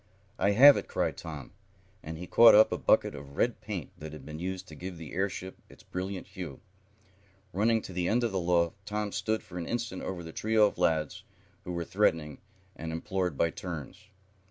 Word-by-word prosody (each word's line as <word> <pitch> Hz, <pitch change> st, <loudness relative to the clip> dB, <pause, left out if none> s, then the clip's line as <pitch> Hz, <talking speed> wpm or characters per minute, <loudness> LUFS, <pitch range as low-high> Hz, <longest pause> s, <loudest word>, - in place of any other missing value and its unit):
"I 100 Hz, -, +3 dB
have 140 Hz, +6 st, +9 dB
it!" -, -, -4 dB
cried -, -, -1 dB
Tom, 75 Hz, -6 st, -8 dB, 0.5 s
and 80 Hz, +1 st, -7 dB
he 90 Hz, -, -6 dB
caught 115 Hz, +6 st, +8 dB
up 110 Hz, +1 st, +7 dB
a -, -, 0 dB
bucket -, -, +3 dB
of 70 Hz, -1 st, -10 dB
red 120 Hz, -1 st, +1 dB
paint, 100 Hz, -7 st, -5 dB
that 75 Hz, 0 st, -8 dB
had 75 Hz, -3 st, -10 dB
been 75 Hz, +1 st, -7 dB
used 95 Hz, +1 st, -4 dB
to -, -, -11 dB
give 90 Hz, +2 st, -7 dB
the 80 Hz, -3 st, -9 dB
airship 95 Hz, 0 st, -3 dB
its -, -, -16 dB
brilliant 95 Hz, +1 st, -5 dB
hue. 90 Hz, -8 st, -7 dB, 0.9 s
Running 110 Hz, +3 st, +2 dB
to 95 Hz, -, -8 dB
the 90 Hz, 0 st, -1 dB
end 120 Hz, +4 st, +2 dB
of 115 Hz, -, 0 dB
the 95 Hz, -, -1 dB
loft 85 Hz, +2 st, +1 dB
Tom 105 Hz, 0 st, -2 dB
stood 110 Hz, +2 st, -1 dB
for 90 Hz, -4 st, -8 dB
an 85 Hz, -, -5 dB
instant 115 Hz, -5 st, -3 dB
over 90 Hz, -2 st, -5 dB
the 80 Hz, -1 st, -9 dB
trio 110 Hz, 0 st, +3 dB
of 105 Hz, -, -2 dB
lads 80 Hz, -2 st, 0 dB, 0.4 s
who 90 Hz, -, -4 dB
were 85 Hz, -1 st, -3 dB
threatening 80 Hz, -7 st, +1 dB, 0.4 s
and 80 Hz, 0 st, -5 dB
imploring 90 Hz, +1 st, -2 dB
by 85 Hz, +4 st, +1 dB
'turns. 90 Hz, +3 st, -7 dB
90 Hz, 205 wpm, -29 LUFS, 80-105 Hz, 0.9 s, have